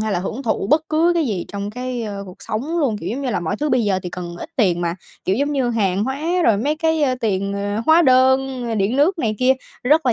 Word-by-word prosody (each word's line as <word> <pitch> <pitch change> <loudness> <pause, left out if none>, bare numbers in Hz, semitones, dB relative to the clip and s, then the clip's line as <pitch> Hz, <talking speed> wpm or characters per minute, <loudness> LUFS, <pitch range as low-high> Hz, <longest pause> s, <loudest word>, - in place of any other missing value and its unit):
hay 215 -1 -1
là 175 - +1
hưởng 225 +8 -4
thụ 220 -4 -1
bất 305 +1 +4
cứ 325 +3 +3
cái 330 -3 +1
gì 200 -7 -2
trong 200 0 -4
cái, 250 +1 -4
ơ, 205 -2 -5
cuộc 185 - -11
sống 285 +11 -2
luôn. 265 -9 +1
Kiểu - - -4
giống 255 +6 -3
như 255 - -1
là - - -1
mọi 175 +5 -2
thứ 300 +4 -1
bây 245 -3 +2
giờ 195 -2 +1
thì 180 - -5
cần 175 -1 -6
ít - - -7
tiền 180 -8 +2
mà, 170 -1 -1 0.3
kiểu, 190 +3 +1
giống 285 +2 0
như 265 -4 +1
hàng 200 -3 +1
hóa, 265 +3 -3 0.2
rồi 220 -3 +4
mấy 290 +8 0
cái, 320 0 +1
ơ, 260 -3 +2
tiền, 200 -3 -1
ờ, 205 +2 -2
hóa 320 +2 +6
đơn 260 -1 +3
rồi 230 - -2
điện 205 +5 +1
nước 325 +6 +3
này 220 -6 0
kia, 255 +1 +4 0.3
rất 300 +2 +3
là 240 - +4
240 Hz, 280 wpm, -20 LUFS, 200-280 Hz, 0.3 s, hóa